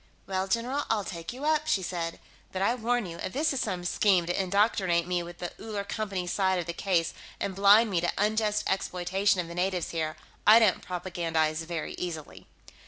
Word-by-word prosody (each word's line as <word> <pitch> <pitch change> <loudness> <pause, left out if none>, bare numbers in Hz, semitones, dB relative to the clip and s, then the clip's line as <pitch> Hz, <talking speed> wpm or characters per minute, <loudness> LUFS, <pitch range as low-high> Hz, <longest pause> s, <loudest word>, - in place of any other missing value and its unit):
"Well, 190 0 -1
general, 245 +8 0
I'll 210 -2 +1
take 170 -3 -6
you 260 +4 -6
up," 310 0 +2
she 195 -11 +2
said. 165 -1 -3 0.3
"But 190 0 -2
I 215 - +3
warn 245 -1 0
you; 170 -2 -7
if - - -5
this 300 +2 +1
is 270 - -1
some 180 -1 -2
scheme 185 -1 +3
to 175 +3 0
indoctrinate 190 -3 +2
me 180 0 0
with 175 0 -9
the 175 - -5
Uller 210 -2 -4
Company's 200 -4 -3
side 190 -2 +2
of 175 - -2
the 170 - -4
case 170 -2 0 0.3
and 195 - -2
blind 205 +3 +6
me 175 -3 +1
to 175 - +1
unjust 210 0 +1
exploitation 190 +1 +1
of 170 - -7
the 170 - -8
natives 180 0 -1
here, 160 -2 -2 0.3
I 215 +2 +10
don't 220 -5 +4
propagandize 165 -3 -1
very 165 -2 -4
easily." 165 -4 -6
190 Hz, 200 wpm, -28 LUFS, 175-210 Hz, 0.3 s, I